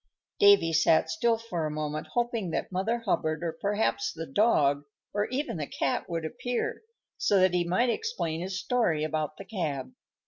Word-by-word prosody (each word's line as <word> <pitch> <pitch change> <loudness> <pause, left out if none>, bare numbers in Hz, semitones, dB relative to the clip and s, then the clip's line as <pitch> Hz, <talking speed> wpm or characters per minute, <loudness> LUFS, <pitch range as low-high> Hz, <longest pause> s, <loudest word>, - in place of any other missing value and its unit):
Davy 200 -5 +6
sat 160 +1 +4
still 235 -8 +2
for 180 -9 -3
a - - -3
moment, 150 0 -3
hoping 235 -5 0
that 165 - -3
Mother 220 +6 -1
Hubbard, 155 -5 0
or 170 - -1
perhaps 160 - 0
the 165 +7 -6
dog, 145 -5 +3 0.3
or 205 0 0
even 260 - -2
the 150 -2 -3
cat, 135 - -2
would 165 -2 -2
appear, 245 +7 -3 0.4
so 200 - +3
that 185 -1 +4
he 175 -1 +2
might 190 +8 +2
explain 425 - -2
his 190 +1 -3
story 190 -11 +1
about 155 -1 -2
the 195 - -9
cab. 165 - -3
180 Hz, 175 wpm, -28 LUFS, 155-225 Hz, 0.4 s, Davy